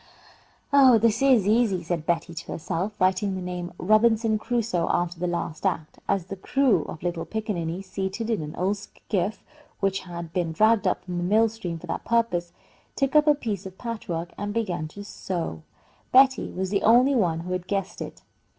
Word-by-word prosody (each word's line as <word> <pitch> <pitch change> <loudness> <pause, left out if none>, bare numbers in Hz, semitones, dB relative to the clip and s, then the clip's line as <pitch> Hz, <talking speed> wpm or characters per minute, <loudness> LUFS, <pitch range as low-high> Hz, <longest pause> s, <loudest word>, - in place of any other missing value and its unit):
"Oh, 265 -4 +7
this 225 +1 +2
is 255 -8 +4
easy," 215 -4 +2
said 165 -1 -3
Betty 170 0 0
to - - -7
herself, 180 +5 -3
writing 190 +1 +2
the - - -3
name 180 -1 -5
"Robinson 220 +2 +3
Crusoe" 220 -7 -1
after 175 0 0
the 180 - -1
last 170 -2 -3
act, 170 -5 -2
as 195 -3 +1
the 190 - -6
crew 230 - +2
of 160 - -8
little 175 -2 -2
pickaninnies, 195 -5 -3
seated 190 +4 -3
in 220 - 0
an 150 +1 -6
old 195 +3 0
skiff 205 0 -3 0.4
which 195 -1 +1
had 170 -2 -8
been 170 -3 -1
dragged 215 +4 +3
up - - 0
from 180 -1 -5
the - - -2
mill 220 +5 +4
stream 190 -7 -5
for - - -10
that - - -4
purpose, 205 -7 0 0.4
took 275 +1 0
up 300 0 +6
a 300 - +6
piece 205 -9 -4
of 190 0 -12
patch 230 -5 -6
work 170 +1 -3
and 205 +1 -3
began 185 -9 -1
to 200 +6 -10
sew. 170 - -4 0.5
Betty 265 0 +5
was 190 0 -3
the 200 - +1
only 245 +5 +5
one 175 -9 +1
who 180 +2 -6
had 180 0 -3
guessed 195 -1 -3
it. - - -8
195 Hz, 195 wpm, -25 LUFS, 175-225 Hz, 0.5 s, Oh